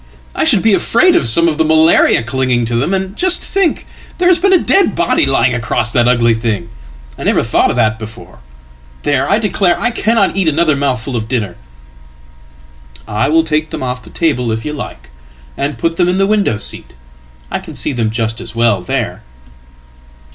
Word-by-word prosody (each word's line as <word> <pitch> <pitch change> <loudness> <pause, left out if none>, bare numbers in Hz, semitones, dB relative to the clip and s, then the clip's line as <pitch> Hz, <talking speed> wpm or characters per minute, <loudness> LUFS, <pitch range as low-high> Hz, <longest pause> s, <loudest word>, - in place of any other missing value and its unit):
I - - -1
should - - +3
be 220 -2 +3
afraid 355 - +3
of 120 - +2
some 170 +10 +4
of 155 -2 -1
the - - +4
malariaclinging 130 -6 +2
to 115 +1 -3
them. 125 +9 0
And 190 0 -2
just 370 0 +1
think, 390 -4 0 0.3
there 360 0 +2
has 360 - +4
been 390 +3 +2
a 375 - +6
dead 390 +3 +2
body 330 - +1
lying 125 +2 +2
acrossthat 120 0 0
ugly 120 -2 +3
thing! 110 -2 -3 0.5
I - - -6
never - - +1
thought - - +1
of - - -1
that 110 0 +1
before. 110 - -11 0.6
There! 145 - 0
I - - +3
declare 195 -4 0
I 240 - 0
cannoteat 205 -5 +1
another 155 0 +1
mouthful 135 -2 -2
of 110 -2 -3
dinner.""I 65 - -8
will 160 +1 +3
take 155 -1 -1
them - - -6
off 125 -1 -4
the 110 - -15
table 125 -8 -1
if 110 0 -4
you 150 - -4
like, 65 - -8 0.4
and 140 +1 -3
put 165 0 -2
them 175 - +2
in 180 - 0
thewindow 195 - +1
seat. - - -10 0.6
I - - -2
can - - -11
see - - -1
them 115 -3 -1
just 115 +1 -3
as 120 0 -9
well 115 -5 +1
there." 90 - -3
125 Hz, 185 wpm, -14 LUFS, 110-170 Hz, 0.6 s, a